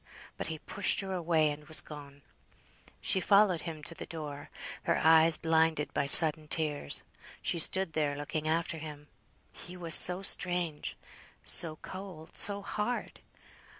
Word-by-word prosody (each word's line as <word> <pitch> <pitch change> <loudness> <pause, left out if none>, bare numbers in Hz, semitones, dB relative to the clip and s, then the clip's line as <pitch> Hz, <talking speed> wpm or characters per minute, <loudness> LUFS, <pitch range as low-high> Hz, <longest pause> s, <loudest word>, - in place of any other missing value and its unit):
But - - -8
he 160 -1 -8
pushed 195 +6 -3
her 190 -1 -9
away, 165 -4 -3
and 150 0 -13
was 155 - +1
gone. 145 -2 -14 0.8
She 190 - -3
followed 200 -2 -1
him 160 -3 -11
to 165 - -10
the - - -13
door, 150 -3 -11 0.4
her - - -3
eyes 160 0 +2
blinded 160 -2 -3
by - - -5
sudden 155 +1 +10
tears; 150 - -4 0.4
she 170 - -6
stood 190 +1 0
there 150 -2 -5
looking 150 +2 -7
after 165 0 -5
him. 150 -1 -14 0.4
He 180 +1 -13
was 170 -2 -3
so 180 +4 +4
strange, 175 -5 -2 0.5
so 160 -2 +2
cold, 185 -4 -13
so 200 0 -2
hard. 215 +4 -8
160 Hz, 150 wpm, -26 LUFS, 150-180 Hz, 0.8 s, sudden